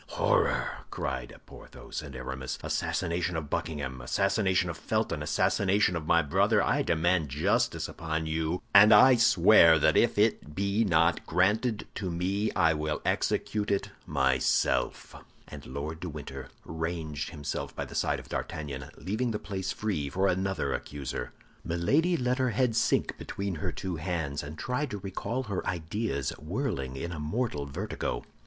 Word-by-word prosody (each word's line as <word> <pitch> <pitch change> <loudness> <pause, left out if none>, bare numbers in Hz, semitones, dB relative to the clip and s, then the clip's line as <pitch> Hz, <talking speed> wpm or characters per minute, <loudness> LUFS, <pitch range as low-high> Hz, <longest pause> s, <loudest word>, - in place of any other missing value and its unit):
"Horror!" - - +1
cried - - -4
Porthos - - -9
and 70 -3 -9
Aramis. 65 +1 -5
"Assassin 85 - -1 0.3
of 75 -3 -6
Buckingham, 70 -5 -3
assassin 100 - +1 0.2
of 85 - -4
Felton, - - -1
assassin 100 - +1 0.3
of 80 -2 -4
my 85 0 +4
brother, 70 - +3
I - - +2
demand 85 -1 +1
justice 70 +4 +1
upon 80 -1 -3
you, 80 +2 -2
and 105 +2 +9
I 130 0 +8
swear 90 -6 +6
that 75 - +3
if - - +3
it 75 +1 +1
be 100 +3 +1
not 85 -3 +2
granted 105 +6 +1
to 95 -3 -3
me, 95 +5 -1
I 85 -3 +3
will 75 0 -3
execute 105 -1 0
it 100 -1 0 0.2
myself." 65 -1 +1 0.3
And - - -10
Lord 75 +4 -5
de 90 - -5
Winter 75 -1 -8 0.2
ranged 80 -2 -4
himself 70 -1 -5
by - - -3
the - - -11
side - - 0
of - - -12
D'Artagnan, 70 -4 -5
leaving 110 - -2
the 110 - -1
place 95 -2 -4
free 95 -11 -2
for 95 +7 +1
another 95 +1 0
accuser. 70 -2 -5 0.3
Milady 145 - +2
let 125 -1 0
her 130 -1 +2
head 120 -1 +1
sink - - +1
between 100 -1 -4
her 80 - -3
two 90 -3 -4
hands, 80 -4 -2
and 75 +2 -8
tried 130 - -2
to 105 - -4
recall 100 +6 -3
her 100 -6 -3
ideas, 85 - -2
whirling 75 - -3
in 85 +6 -4
a 85 - -5
mortal 75 - -2
vertigo. 65 -3 -4
85 Hz, 155 wpm, -29 LUFS, 75-100 Hz, 0.3 s, and